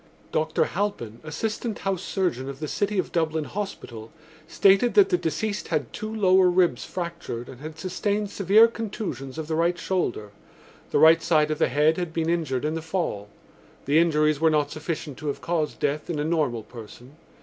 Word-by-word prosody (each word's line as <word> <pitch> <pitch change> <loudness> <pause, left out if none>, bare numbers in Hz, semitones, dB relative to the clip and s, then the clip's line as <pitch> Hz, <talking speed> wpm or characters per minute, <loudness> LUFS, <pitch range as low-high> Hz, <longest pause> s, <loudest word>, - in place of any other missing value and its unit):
Dr 155 0 +1
Halpin, 170 - -3
assistant 215 +8 -3
house 195 -2 -2
surgeon 170 -11 -2
of 135 -1 -8
the 155 - -4
City 205 +5 -1
of 185 - -1
Dublin 160 -2 0
Hospital, 140 - -6 0.4
stated 195 +7 +4
that 200 -2 +6
the - - +3
deceased 175 +6 -2
had 150 -7 -2
two 215 0 -5
lower 190 -4 +4
ribs 175 -8 +2
fractured 170 -9 -5
and 130 0 -11
had 155 +1 -8
sustained 200 +4 -2
severe 205 +4 +5
contusions 195 - -5
of 160 - -4
the 160 - -2
right 170 +2 +1
shoulder. 120 - -2 0.6
The - - +1
right 160 +1 +7
side 155 -2 +2
of 155 - -2
the - - +3
head 150 +4 +3
had 175 -3 -3
been 165 0 0
injured 150 -6 -1
in 155 - 0
the 165 - -3
fall. 160 - -3 0.6
The 145 +3 +4
injuries 155 -2 +2
were 160 - +5
not 150 -2 +1
sufficient 155 -3 -5
to 155 - -6
have 145 - -2
caused 165 -3 -2
death 150 +2 -1
in 165 - -2
a 145 - -1
normal 150 -9 0
person. 120 +5 -12
160 Hz, 185 wpm, -25 LUFS, 150-185 Hz, 0.6 s, right